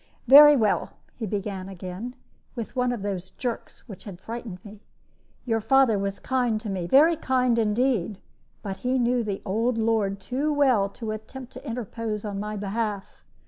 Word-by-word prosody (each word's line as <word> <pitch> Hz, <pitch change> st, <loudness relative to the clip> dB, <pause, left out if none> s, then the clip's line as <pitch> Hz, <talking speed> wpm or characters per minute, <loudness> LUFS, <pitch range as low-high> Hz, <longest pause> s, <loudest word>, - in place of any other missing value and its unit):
"Very 295 Hz, +3 st, +10 dB
well," 215 Hz, -6 st, +1 dB, 0.2 s
he 225 Hz, -, -4 dB
began 195 Hz, -1 st, -4 dB
again, 190 Hz, +6 st, -7 dB, 0.4 s
with 230 Hz, -3 st, -6 dB
one 250 Hz, -1 st, +1 dB
of 235 Hz, -5 st, -4 dB
those 190 Hz, -2 st, -4 dB
jerks 245 Hz, 0 st, -6 dB
which 195 Hz, -5 st, -11 dB
had 190 Hz, -4 st, -9 dB
frightened 225 Hz, -2 st, -7 dB
me, 205 Hz, 0 st, -12 dB, 0.6 s
"your 225 Hz, -2 st, 0 dB
father 235 Hz, -2 st, +4 dB
was 195 Hz, 0 st, -2 dB
kind 245 Hz, -4 st, 0 dB
to 215 Hz, -2 st, -5 dB
me, 180 Hz, -3 st, -3 dB
very 305 Hz, -, +6 dB
kind 255 Hz, -5 st, +1 dB
indeed; 220 Hz, -3 st, +1 dB, 0.5 s
but 195 Hz, -2 st, -4 dB
he 255 Hz, +1 st, 0 dB
knew 245 Hz, -1 st, +1 dB
the 200 Hz, -3 st, -4 dB
old 225 Hz, +4 st, 0 dB
lord 220 Hz, -3 st, +1 dB
too 270 Hz, +9 st, -2 dB
well 260 Hz, -9 st, +3 dB
to 215 Hz, +2 st, -6 dB
attempt 240 Hz, +4 st, -8 dB
to -, -, -10 dB
interpose 225 Hz, -2 st, -4 dB
on 200 Hz, -1 st, -4 dB
my 210 Hz, +1 st, -4 dB
behalf. 205 Hz, 0 st, -4 dB
220 Hz, 170 wpm, -25 LUFS, 200-250 Hz, 0.6 s, Very